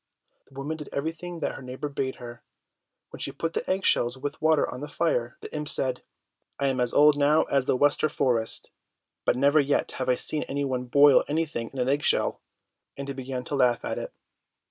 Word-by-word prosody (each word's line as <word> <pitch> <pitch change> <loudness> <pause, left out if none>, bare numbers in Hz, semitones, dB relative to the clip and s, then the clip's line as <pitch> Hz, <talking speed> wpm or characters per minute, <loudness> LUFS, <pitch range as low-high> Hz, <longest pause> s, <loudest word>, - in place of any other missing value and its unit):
The 135 - -21
woman 145 +4 -4
did 150 - -8
everything 165 +3 -4
that - - 0
her - - -9
neighbour 130 +3 -5
bade 135 -2 -3
her. 120 -1 -10 0.7
When - - -10
she - - -3
put 165 0 -3
the - - -3
egg 190 +1 0
shells 120 +2 +2
with 145 +2 -5
water 155 -1 +3
on 125 - -7
the 145 - -4
fire, 125 -7 -1
the - - -8
imp 150 0 -3
said, 130 -4 0 0.6
"I 140 -1 +1
am 130 -1 -1
as 125 -1 +1
old 150 0 +5
now 150 +2 +4
as 140 -2 0
the 130 - +1
Wester 145 +2 +3
forest, 120 -6 0 0.5
but - - +3
never 140 +3 +4
yet 145 0 +1
have 130 -1 -3
I 125 - +4
seen 150 +4 -2
any 140 +1 -1
one 130 -2 -2
boil 140 +3 +6
anything 150 -6 -2
in 135 - -11
an 125 -1 0
egg 140 +2 +2
shell!" - - +1 0.6
And 140 0 -5
he - - -2
began 130 -1 -5
to 145 - -3
laugh 125 -3 +2
at - - -2
it. - - -6
140 Hz, 215 wpm, -26 LUFS, 125-150 Hz, 0.7 s, boil